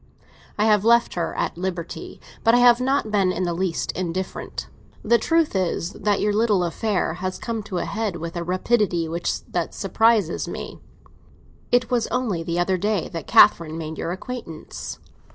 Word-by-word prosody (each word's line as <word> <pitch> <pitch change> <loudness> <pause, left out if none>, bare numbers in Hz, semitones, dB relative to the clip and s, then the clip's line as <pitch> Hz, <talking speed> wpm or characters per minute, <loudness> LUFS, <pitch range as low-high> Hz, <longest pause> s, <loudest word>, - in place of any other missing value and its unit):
I 210 - +2
have 210 -2 +4
left 235 +1 +4
her 170 -2 -2
at - - -2
liberty, 180 -2 -5 0.2
but 225 +1 +5
I - - +6
have 245 0 +6
not 265 -4 0
been 195 -3 +3
in 185 +1 -2
the 175 -1 0
least 175 -1 -1
indifferent. 185 +1 -4 0.4
The 235 +2 +4
truth 325 +1 +1
is 180 -1 -1
that 205 -1 0
your 210 0 +1
little 210 -4 +2
affair 185 0 -1
has 185 +2 -4
come 230 -2 -3
to 205 -3 -5
a - - -1
head 215 -3 -2
with 165 +1 -6
a 170 - -2
rapidity 185 -1 +1 0.4
that 175 -2 -2
surprises 210 -2 +2
me. - - -7 0.9
It 245 +1 +2
was 240 -2 +1
only 230 -9 -1
the 170 +1 -3
other 185 +1 +1
day 205 -2 0
that 165 -3 -6
Catherine 160 -1 +5
made 160 -1 -6
your 170 - -2
acquaintance." 190 -4 -7
190 Hz, 170 wpm, -23 LUFS, 170-225 Hz, 0.9 s, I